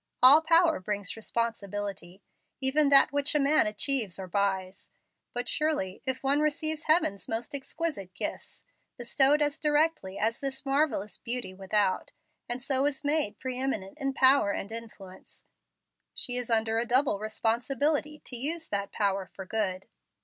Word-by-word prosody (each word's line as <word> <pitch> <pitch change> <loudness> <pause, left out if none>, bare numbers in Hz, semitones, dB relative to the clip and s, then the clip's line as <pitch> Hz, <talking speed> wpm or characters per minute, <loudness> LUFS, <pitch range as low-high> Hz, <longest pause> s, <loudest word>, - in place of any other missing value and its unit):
All 280 +5 +10
power 330 0 +4
brings 200 0 -3
responsibility, 205 -5 -4 0.4
even 280 +2 +2
that 275 -1 +6
which 285 +1 +1
a - - +4
man 285 -3 +3
achieves 215 -2 -1
or 190 - -6
buys; 190 0 -2 0.4
but 245 0 -4
surely, 300 -12 -1
if 260 0 -2
one 275 +2 +3
receives 305 +1 -1
Heaven's 310 - +2
most 225 +4 -4
exquisite 275 - -4
gifts, - - -5 0.3
bestowed 270 +4 +3
as 295 +2 -2
directly 295 -10 +1
as 225 +2 -1
this 270 0 -5
marvellous 270 -8 0
beauty 240 -6 -3
without, 195 0 -1 0.4
and 245 +1 -3
so 275 0 +1
is 290 -1 -3
made 290 -8 0
pre 255 -1 -5
eminent 260 -2 -3
in 275 -1 -1
power 260 -5 +5
and 200 +1 -4
influence, 215 -5 -10 0.7
she 245 - 0
is 245 -1 -1
under 225 0 +2
a 235 - -1
double 255 -4 +2
responsibility 275 +8 0
to 250 - -6
use 315 +7 -2
that 200 0 -3
power 195 -2 0
for 190 - -9
good. 190 -3 -2
245 Hz, 150 wpm, -28 LUFS, 200-285 Hz, 0.7 s, All